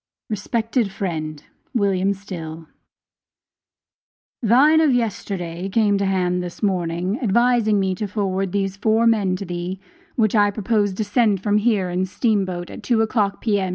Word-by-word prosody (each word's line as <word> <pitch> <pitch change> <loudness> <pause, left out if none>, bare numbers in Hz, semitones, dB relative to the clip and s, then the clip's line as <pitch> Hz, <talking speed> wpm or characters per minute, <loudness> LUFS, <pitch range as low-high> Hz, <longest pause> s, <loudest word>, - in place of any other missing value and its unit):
RESPECTED 225 +2 -1
FRIEND: 155 -6 -4 0.3
WILLIAM 200 -2 +1
STILL: 165 -5 -8 1.7
Thine 275 +8 +5
of 310 -3 +4
yesterday, 190 -6 -3
came 205 -1 +2
to 200 - 0
hand 180 -2 0
this 180 +4 -8
morning, 180 +1 -1
advising 235 -1 +3
me 190 -1 0
to 205 +3 -3
forward 195 -2 -2
those 195 0 -1
four 220 +2 +2
men 205 -5 +2
to 195 - -6
thee, 175 +1 -4 0.4
which 215 -4 +2
I 205 -2 +4
propose 205 -1 0
to 215 - -1
send 205 -3 +1
from 210 0 +2
here 205 -5 +1
in 180 - -1
the 185 - +1
steam 210 0 +1
boat, 175 -1 -5
at - - -9
two 230 -3 +2
o'clock, 210 -3 0
P.M. 205 -4 0
200 Hz, 155 wpm, -21 LUFS, 185-220 Hz, 1.7 s, Thine